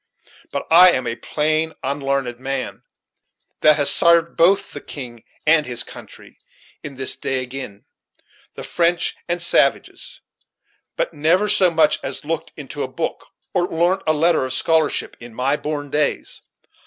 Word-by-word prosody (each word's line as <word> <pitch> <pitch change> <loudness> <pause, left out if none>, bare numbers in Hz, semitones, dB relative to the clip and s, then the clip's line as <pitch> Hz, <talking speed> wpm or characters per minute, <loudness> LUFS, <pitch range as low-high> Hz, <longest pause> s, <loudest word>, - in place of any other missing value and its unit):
But 140 - -4
I 175 +2 +8
am 130 - -1
a 115 - -3
plain 155 +5 -1
unlarned 135 -3 -2
man, 135 0 -4 0.8
that 155 0 +5
has 145 -2 +5
sarved 170 0 +3
both 185 +4 +2
the - - -8
king 120 -5 -7 0.2
and 155 0 +5
his 125 -2 0
country, - - -13 0.4
in 140 -2 -8
his 130 -1 +1
day, 130 -1 -1
agin' 125 -6 -8 0.7
the - - -7
French 170 0 +1
and 175 0 -1
savages, 150 -5 0 0.7
but - - -2
never 170 +7 +2
so 190 -3 +4
much 160 -1 +2
as - - -5
looked - - -4
into - - -7
a - - -2
book, - - -5 0.3
or 180 -1 +1
larnt 175 +4 0
a 155 - +3
letter 160 0 +2
of 130 0 -3
scholarship, 160 +2 0
in 120 -1 -12
my 135 +4 +1
born 145 -2 -5
days. 150 -1 -2
150 Hz, 155 wpm, -20 LUFS, 135-170 Hz, 0.8 s, I